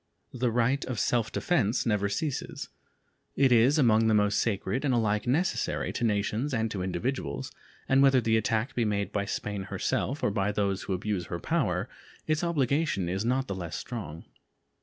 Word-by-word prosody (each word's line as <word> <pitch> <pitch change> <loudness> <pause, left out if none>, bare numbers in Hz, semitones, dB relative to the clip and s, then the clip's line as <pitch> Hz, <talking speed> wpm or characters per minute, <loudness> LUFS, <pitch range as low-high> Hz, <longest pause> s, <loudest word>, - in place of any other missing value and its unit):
The 125 -1 0
right 120 +4 +1
of 125 -4 -3
self 115 -3 +1
defense 125 - +1
never 105 -3 +1
ceases. 140 +7 -3 0.7
It 135 -2 +4
is 125 +5 +5
among 115 -5 +4
the 110 - +4
most 105 0 +2
sacred, 105 +3 -1
and 135 -4 +2
alike 105 -1 0
necessary 165 +9 0
to - - -3
nations 110 +5 0
and 110 -1 -1
to 100 - -3
individuals, 120 +8 -3 0.4
and 135 0 +4
whether 135 -1 +6
the 110 -1 +1
attack 110 +3 0
be 120 - 0
made 100 -2 -1
by 100 -1 -1
Spain 100 -1 -4
herself 140 +8 -2
or - - +2
by 100 0 0
those 100 -1 -1
who 95 - -3
abuse 95 -2 -2
her 85 - -3
power, - - 0 0.4
its 155 +1 0
obligation 145 - +1
is 95 +3 -1
not 130 +3 +1
the 100 - -3
less 85 -4 -5
strong. 95 -10 -6
110 Hz, 180 wpm, -28 LUFS, 100-130 Hz, 0.7 s, whether